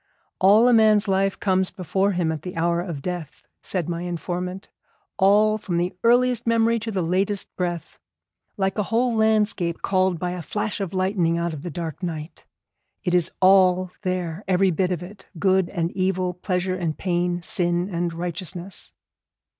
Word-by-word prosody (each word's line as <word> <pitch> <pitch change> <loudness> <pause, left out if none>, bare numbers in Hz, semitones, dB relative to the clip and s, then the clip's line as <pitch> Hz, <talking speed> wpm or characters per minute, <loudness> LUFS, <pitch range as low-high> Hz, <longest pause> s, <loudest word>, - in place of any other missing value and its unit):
'All 210 +5 +6
a 250 - +5
man's 215 -2 +5
life 195 0 +1
comes 190 -2 +1
before 190 +3 -1
him 175 -3 0
at 160 - -4
the 180 - -7
hour 170 +1 +1
of 165 -6 -6
death,' 175 -4 -6 0.2
said 180 -5 -2
my 170 -1 -3
informant; 180 +2 -4 0.5
'all, 210 +2 +4
from 175 -4 -3
the 175 +1 0
earliest 245 0 +3
memory 230 0 +3
to 225 +1 -5
the 190 -4 -1
latest 190 +4 -1
breath. 175 -3 -4 0.6
Like 195 +1 0
a 200 - -1
whole 235 +2 +2
landscape 215 -6 +1
called 185 -2 +2
by 180 +2 -2
a 180 -1 -5
flash 210 +6 -3
of 195 -2 -4
lightning 185 -3 +1
out 170 -1 -1
of 150 - -7
the 175 - -5
dark 165 0 -5
night. 160 -3 -6 0.6
It 180 - -1
is 175 -1 +2
all 185 -1 +5
there, 185 -1 -3
every 190 0 +3
bit 180 +2 0
of 175 -1 -2
it, 195 +2 -12
good 190 0 +2
and 170 -3 -2
evil, 185 -1 0
pleasure 180 +1 -2
and 170 -4 -3
pain, 175 -1 -1
sin 175 0 0
and 170 0 -1
righteousness.' 175 +2 -6
185 Hz, 170 wpm, -23 LUFS, 175-195 Hz, 0.6 s, All